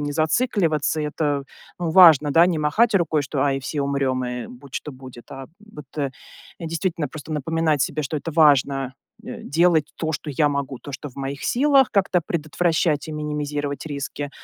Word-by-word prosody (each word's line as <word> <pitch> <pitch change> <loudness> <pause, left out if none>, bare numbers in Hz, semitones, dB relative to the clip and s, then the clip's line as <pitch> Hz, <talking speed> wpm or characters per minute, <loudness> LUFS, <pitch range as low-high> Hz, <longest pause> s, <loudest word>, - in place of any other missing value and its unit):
не 145 0 -3
зацикливаться. 160 - +1
Это, 150 -1 -1 0.4
ну, 170 -2 -2
важно, 160 -5 +7
да, 170 +3 +6
не 175 -3 0
махать 205 +10 +2
рукой, 160 -5 +2
что: 140 0 -2
"Ай, 135 -1 +1
все 140 +2 -3
умрем, 135 -2 -1
и 125 -1 -4
будь 125 +1 -14
что 150 - -5
будет". 130 -2 -13
А 135 0 -8 0.3
вот, 150 -2 -9
э, 140 -2 -1 0.5
действительно 165 -1 -2
просто 155 +3 -10
напоминать 155 -1 0
себе, 155 +3 -2
что 150 +2 -3
это 155 +3 -5
важно 140 -4 +3 0.3
э - - -8
делать 160 0 +2
то, 160 -1 -2
что 150 0 -4
я 145 +2 +2
могу, 140 -3 -3
то, 145 - -10
что 145 +1 -7
в - - -24
моих 140 +1 -5
силах, 275 0 +3
как-то 190 -4 +1
предотвращать 160 -1 0
и - - -5
минимизировать 150 -2 -3
риски. 145 -1 -5
150 Hz, 180 wpm, -22 LUFS, 140-165 Hz, 0.5 s, важно